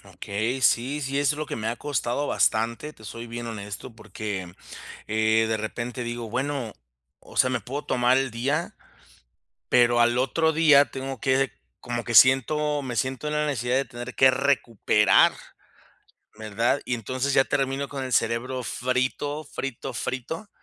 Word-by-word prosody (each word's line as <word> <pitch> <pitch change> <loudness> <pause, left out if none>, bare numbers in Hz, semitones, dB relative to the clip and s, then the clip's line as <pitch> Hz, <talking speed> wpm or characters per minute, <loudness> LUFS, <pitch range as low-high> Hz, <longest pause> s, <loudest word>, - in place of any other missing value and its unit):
Okey, 110 +7 -2
sí, 130 +4 +2
sí, 140 0 -2
eso 145 +1 +2
es - - -11
lo 155 - -3
que - - -5
me 110 0 -3
ha 115 - -1
costado 145 0 -2
bastante. 115 +4 0
Te 110 - -19
soy 115 +3 -8
bien 120 +1 -6
honesto, 105 +1 -7
porque, 100 -4 -6 0.6
eh, 110 +1 +2
de 110 0 0
repente 120 +3 -5
digo, 120 0 -5
bueno, 130 -2 -2 0.5
o - - -14
sea, 125 - +5
me 130 - -1
puedo 140 +4 -6
tomar 125 +1 +3
el 135 -2 0
día, 125 +5 -2 0.9
pero 120 0 +4
al 120 0 +4
otro 160 +5 +1
día 155 -3 +6
tengo 135 0 -5
que 135 +2 +1 0.3
como 120 -1 -4
que 120 - -4
siento, 145 +5 +5
me 130 -3 -5
siento 130 +3 -2
en 150 - -2
la 150 0 +1
necesidad 125 -4 -1
de 135 - +1
tener 120 0 -8
que 130 - +6
recuperar, 130 -6 +3 1.1
¿verdad? 110 +5 0
Y 125 - -1
entonces, 130 +5 -2
ya 135 - +5
termino 135 0 -1
con 135 -2 -5
el 130 - -4
cerebro 125 +3 0
frito, 130 +5 -2
frito, 135 -3 -6
frito. 160 - -4
125 Hz, 165 wpm, -25 LUFS, 115-140 Hz, 1.1 s, día